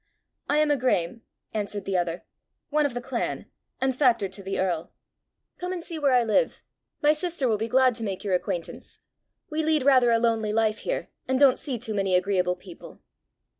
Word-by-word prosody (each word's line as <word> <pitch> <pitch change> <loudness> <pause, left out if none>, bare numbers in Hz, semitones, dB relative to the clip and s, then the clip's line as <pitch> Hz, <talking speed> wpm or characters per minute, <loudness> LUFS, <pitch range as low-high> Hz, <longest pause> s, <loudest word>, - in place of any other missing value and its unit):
"I 295 - +3
am 305 -1 +3
a 290 - +3
Graeme," 230 -5 0 0.3
answered 205 -1 -3
the 195 - -2
other, 175 -1 -1 0.5
"one 300 0 +3
of 250 - -9
the 245 - -3
clan, - - -3 0.3
and 265 -1 0
factor 245 -7 +3
to 195 +1 -8
the 195 0 -3
earl. 175 -3 -1 0.7
Come 360 +1 -3
and 360 -2 -4
see 330 -2 -5
where 285 -2 +3
I 245 -1 +5
live. 230 - +1 0.4
My 300 +1 +6
sister 325 -3 -2
will 215 -3 +1
be 225 - -1
glad 255 +1 +4
to 230 0 -6
make 195 -3 -4
your 200 -3 -1
acquaintance. 175 -1 -3 0.5
We 310 +1 0
lead 310 -3 +2
rather 255 -3 +5
a 230 - +4
lonely 225 -2 +1
life 220 -1 +1
here, - - -3 0.2
and 260 0 +1
don't 275 -3 +5
see 265 -4 -3
too 225 -1 -4
many 195 -2 +1
agreeable 180 -1 +1
people." 180 -1 -13
230 Hz, 200 wpm, -26 LUFS, 195-280 Hz, 0.7 s, My